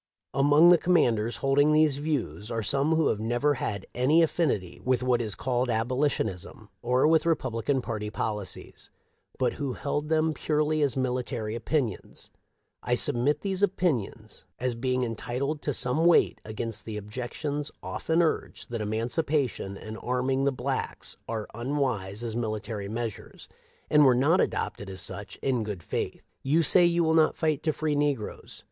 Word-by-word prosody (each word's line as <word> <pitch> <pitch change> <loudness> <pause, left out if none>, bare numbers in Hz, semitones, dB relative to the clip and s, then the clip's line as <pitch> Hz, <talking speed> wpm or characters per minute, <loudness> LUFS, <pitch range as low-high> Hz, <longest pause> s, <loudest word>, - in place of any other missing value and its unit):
Among 145 +5 +6
the 175 -1 +7
commanders 120 -10 +2
holding 145 +2 +4
these 155 -2 +4
views 145 -8 -3
are 115 -2 -2
some 140 +8 +1
who 160 -2 +3
have 105 - -1
never 120 +6 +1
had 100 -6 -3
any 145 +7 +4
affinity 130 - -1
with 130 -1 +1
what 125 -1 +2
is 110 -4 -1
called 125 0 -1
abolitionism 115 - -1
or 125 +4 +3
with 160 0 +4
Re 165 -1 +3
publican 125 +1 -2
party 105 -2 -4
policies, 105 -3 -5 0.5
but - - +1
who 135 -3 -1
held 145 +3 -3
them 160 0 +2
purely 155 0 0
as 140 -3 +1
military 125 -3 -2
opinions. 120 -1 -3 0.5
I - - +1
submit 140 +5 +3
these 195 -1 -2
opinions 135 - -1
as 125 0 -1
being 130 +2 -1
entitled 125 +6 -3
to 145 - -1
some 135 +5 +1
weight 175 - +4
against 110 0 -4
the 110 -2 -5
objec 105 +4 -6
tions 145 -1 -3
often 165 +1 0
urged 160 - -2
that 115 -2 -3
emancipation 115 - -1
and 110 +2 -8
arming 130 +2 0
the 140 - +3
blacks 130 - -4
are 110 -2 -3
unwise 120 -5 -2
as 115 -2 -3
military 110 -3 -3
measures, 115 -1 -6 0.4
and 150 -1 +5
were 130 -3 +6
not 145 +8 +3
adopted 100 - -2
as 95 -1 -5
such 100 +3 -6
in 125 -4 +1
good 105 -5 -5
faith.* - - -4
" - - -49
You 155 +5 +2
say 175 +4 +6
you 170 0 +2
will 160 0 +2
not 160 -1 +4
fight 155 -3 0
to 155 - +1
free 155 0 -1
negroes. 145 -6 -2
130 Hz, 165 wpm, -27 LUFS, 110-150 Hz, 0.5 s, the